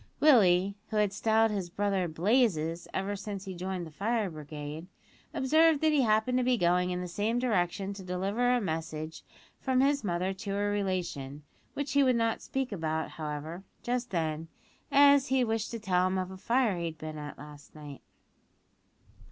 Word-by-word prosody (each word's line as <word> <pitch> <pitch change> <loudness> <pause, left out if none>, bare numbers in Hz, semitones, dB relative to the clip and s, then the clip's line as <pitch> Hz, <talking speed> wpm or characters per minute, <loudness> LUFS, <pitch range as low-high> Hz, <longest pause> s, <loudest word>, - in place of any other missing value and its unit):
Willie 200 -10 +5 0.2
(who 215 - -2
had 210 -2 +2
styled 220 +1 +2
his 195 -4 -3
brother 195 -1 0
"Blazes" 170 -2 +1
ever 195 +2 -2
since 200 0 -6
he 190 - -5
joined 180 0 -4
the 160 - -11
fire 210 +3 -1
brigade) 150 +1 -7 0.4
observed 315 +3 +4
that 315 -1 +4
he 295 -2 +3
happened 225 +2 +2
to - - +1
be 250 0 +2
going 180 -1 +2
in 180 0 -2
the 180 - -4
same 210 +6 -1
direction 195 -5 0
to 200 - -9
deliver 195 +7 0
a 250 0 +3
message 160 -4 -4 0.4
from 260 -1 +1
his 280 0 +2
mother 185 0 -1
to 195 +1 -5
a 205 0 0
relation, 175 -8 -3 0.3
which 285 0 -3
he 285 - +4
would 255 -2 +4
not 230 -1 0
speak 265 -2 -3
about, 160 -4 -2
however, 155 +3 -6 0.2
just 245 0 -2
then, 160 -3 -2 0.4
as 280 -1 +6
he 260 -1 +2
wished 225 -2 -1
to 230 - -5
tell 185 -3 +2
him 185 0 -1
of 185 0 -3
a 190 - -8
fire 230 -2 +1
he 170 - -2
had 160 -1 -5
been 155 -1 -7
at 145 0 -7
last 145 +1 -13
night. 145 -2 -10
195 Hz, 185 wpm, -30 LUFS, 170-235 Hz, 0.4 s, as